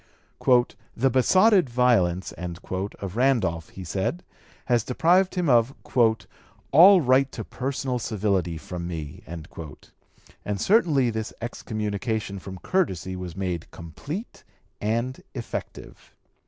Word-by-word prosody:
"The 130 +3 +2
besotted 185 - +4
violence" 115 -8 +2
of 95 +2 -5
Randolph, 110 -11 +1
he 95 - -9
said, 95 - -2 0.4
has 120 -4 +2
deprived 175 +10 +2
him 180 -2 0
of 120 0 +3 1.0
"all 180 +6 +8
right 130 0 +3
to - - -6
personal 130 -1 -3
civility 100 -7 -1
from 85 +2 -6
me;" 80 0 -6
and 85 +5 -9
certainly 155 - +3
this 110 0 -4
excommunication 110 -3 -3
from 95 0 -8
courtesy 95 - -1
was 90 -2 -6
made 90 -4 -3
complete 145 - -8 0.4
and 115 +5 -1
effective. 120 -3 -7
110 Hz, 105 wpm, -25 LUFS, 90-135 Hz, 1.0 s, all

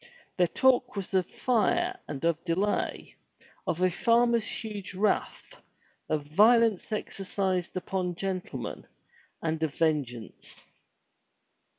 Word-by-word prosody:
Their 180 -1 +4
talk 255 +3 +3
was 195 -1 -4
of 185 -2 +2
fire 350 - +1
and 140 +2 -4
of 165 -1 +1
delay, 190 +4 -1 0.5
of 175 +3 0
a 185 - +4
farmer's 235 +3 +3
huge 205 -4 -5
wrath, 210 +3 -1 0.5
of 155 -2 0
violence 215 +6 +4
exercised 190 -3 -2
upon 180 -1 -2
gentlemen, 185 0 -4 0.6
and 160 -1 -1
of 155 -3 -1
vengeance. 140 -8 -2
190 Hz, 105 wpm, -28 LUFS, 170-220 Hz, 0.6 s, Their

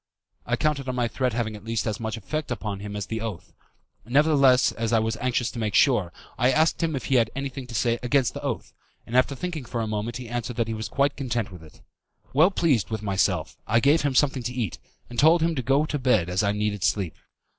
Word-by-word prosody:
I 120 - +2
counted 140 -1 -1
on 130 - -2
my 120 -1 +1
threat 125 +1 -1
having 110 -2 -2
at 105 - -11
least 115 -2 -2
as 110 -1 -2
much 110 0 -3
effect 155 +9 -4
upon 105 -5 -4
him 105 0 -6
as 105 - -3
his 110 0 -4
oath. 110 -7 -6 0.5
Nevertheless, 135 +1 +4
as 115 0 -3
I 115 - +4
was 110 0 0
anxious 125 -1 0
to 120 - -7
make 105 -2 -1
sure, 105 - +4 0.3
I 125 +2 +4
asked 160 +6 +2
him 160 -2 0
if 135 - -4
he 135 - +1
had 115 -2 +3
anything 135 -1 -5
to 120 - -8
say 120 +1 +1
against 125 0 +2
the - - -6
oath, - - -4 0.3
and 120 - -6
after 130 +2 +3
thinking 165 -1 -4
for 120 0 -4
a 115 - 0
moment 110 +2 -3
he 125 -1 -8
answered 120 0 -4
that 115 -1 0
he 115 - -2
was 110 0 -4
quite 140 0 +1
content 120 -7 -2
with 90 -3 -11
it. 80 - -16 0.5
Well 155 +7 +6
pleased 160 - +1
myself, 95 -5 0
I 115 +3 +4
gave 145 +6 +4
him 140 -2 0
something 135 -1 +3
to 120 +1 -4
eat, 115 -9 -3 0.3
and 120 - -5
told 160 +2 +5
him 165 0 +2
to 135 - -2
go 135 +4 +2
to 150 -1 -3
bed 110 -9 +2
as 90 - +1
I 100 -1 +2
needed 105 -2 -2
sleep. 95 -7 0
120 Hz, 240 wpm, -25 LUFS, 110-135 Hz, 0.5 s, Well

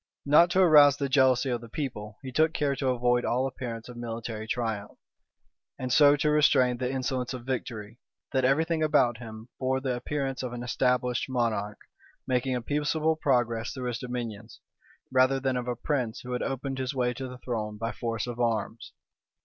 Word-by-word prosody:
Not 150 +4 +6
to 185 +1 +4
rouse 145 -4 +7
the 140 -1 -1
jealousy 130 -1 +3
of 120 -1 -2
the 115 - -11
people, 110 -6 -5
he 130 - -6
took 160 +4 +2
care 140 -2 0
to 135 - -2
avoid 120 -1 +2
all 125 +2 +1
appearance 120 -4 -5
of 125 -1 -10
military 115 -2 -5
triumph; 110 -3 -3 0.8
and 125 -1 -2
so 145 0 +7
to 150 +1 +1
restrain 130 -5 +4
the 125 0 -2
insolence 130 -1 -2
of 120 -2 -9
victory, 120 -3 -5 0.3
that 130 -1 +1
every 135 +5 +3
thing 165 -1 -1
about 140 -7 +3
him 110 0 -10
bore 130 0 0
the 130 -2 -2
appearance 135 +1 -3
of 125 -2 -4
an 120 0 -5
established 125 0 0
monarch, 110 -5 -1 0.5
making 130 0 0
a 125 - -3
peaceable 150 +3 0
progress 120 -6 0
through 125 -2 -4
his 120 -1 -4
dominions, 115 -3 -6 0.5
rather 130 +1 +4
than 130 -1 -1
of 125 0 -3
a 125 - -1
prince 125 -2 -2
who 125 - -8
had 125 - -2
opened 135 0 -3
his 130 +1 -3
way 125 -1 +1
to 130 +2 -6
the 125 0 -9
throne 110 -4 -4
by 115 +2 -3
force 115 -3 -3
of 120 -1 -6
arms. 115 -1 -2
125 Hz, 190 wpm, -28 LUFS, 120-135 Hz, 0.8 s, rouse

